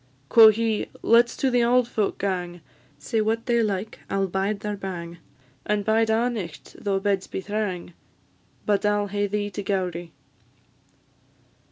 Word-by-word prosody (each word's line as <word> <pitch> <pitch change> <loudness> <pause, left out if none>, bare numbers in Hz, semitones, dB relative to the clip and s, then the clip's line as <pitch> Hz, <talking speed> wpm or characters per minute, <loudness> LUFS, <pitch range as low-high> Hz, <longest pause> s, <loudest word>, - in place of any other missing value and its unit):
Quo' 225 -1 +9
he, 220 0 +1 0.2
"Let 235 +1 +5
's - - -9
to 265 - +1
the 245 0 +3
auld 245 +1 +3
folk 215 -4 -1
gang; 180 -3 -3 0.4
Say 215 +10 -1
what 225 +1 -1
they 235 -2 +2
like, 210 -1 -2
I - - -2
'll 195 0 +2
bide 195 +2 -2
their 210 -1 -3
bang, 175 -3 -6 0.4
And 210 -1 -1
bide 220 0 +2
a' 225 +2 +2
nicht, 195 -10 -6
though 195 -1 +1
beds 195 -1 0
be - - -4
thrang; 190 -4 -3 0.7
But 205 -1 +1
I 210 0 +3
'll 205 0 -1
hae 205 +1 0
thee 205 0 -2
to 205 - -4
Gowrie." 180 -4 -2
205 Hz, 170 wpm, -24 LUFS, 190-220 Hz, 0.7 s, Quo